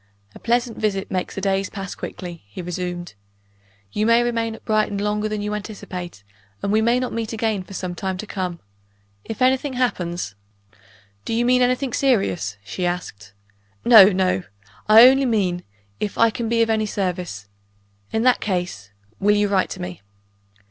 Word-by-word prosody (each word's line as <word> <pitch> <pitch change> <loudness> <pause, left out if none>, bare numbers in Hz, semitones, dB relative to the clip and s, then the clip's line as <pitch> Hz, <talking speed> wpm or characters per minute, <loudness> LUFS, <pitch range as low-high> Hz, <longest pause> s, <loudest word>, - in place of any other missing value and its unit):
"A - - -12
pleasant 235 0 0
visit 195 -3 -1
makes 185 -1 -2
the 195 - -4
days 195 0 0
pass 195 -2 -6
quickly," 175 -2 -7
he 100 - -8
resumed. 175 0 -4 0.8
"You 215 +1 0
may 230 +1 +5
remain 230 -2 -1
at - - -16
Brighton 215 -2 +1
longer 210 +1 -1
than 210 -1 -3
you 210 0 -2
anticipate; 185 - -7 0.4
and 200 - 0
we 215 +1 +3
may 235 +2 +3
not 255 -1 -3
meet 230 -1 -3
again 220 -3 -1
for 185 +2 -10
some 180 -1 -4
time 190 +1 -3
to 215 - -6
come. 180 -4 -4 0.6
If 225 +3 -3
anything 260 +2 +2
happens 180 - -2 0.5
" 100 -2 -29
"Do 225 - -1
you 240 +1 +1
mean 250 +1 +4
anything 250 0 +1
serious?" 100 - +1
she 105 - -5
asked. 165 - -4 0.5
"No, 220 -5 +10
no! 185 - +2 0.5
I 225 +3 +10
only 270 +1 +4
mean 185 -6 0 0.4
if 205 - -3
I 230 0 +5
can 225 +1 -3
be 230 0 +3
of 225 - -2
any 215 -1 +1
service. 180 - -3 0.6
In 220 - 0
that 255 0 +4
case, 175 - -3 0.3
will 205 +1 +3
you 205 0 +2
write 190 -2 +2
to - - -6
me?" 90 0 -7
205 Hz, 175 wpm, -22 LUFS, 180-230 Hz, 0.8 s, No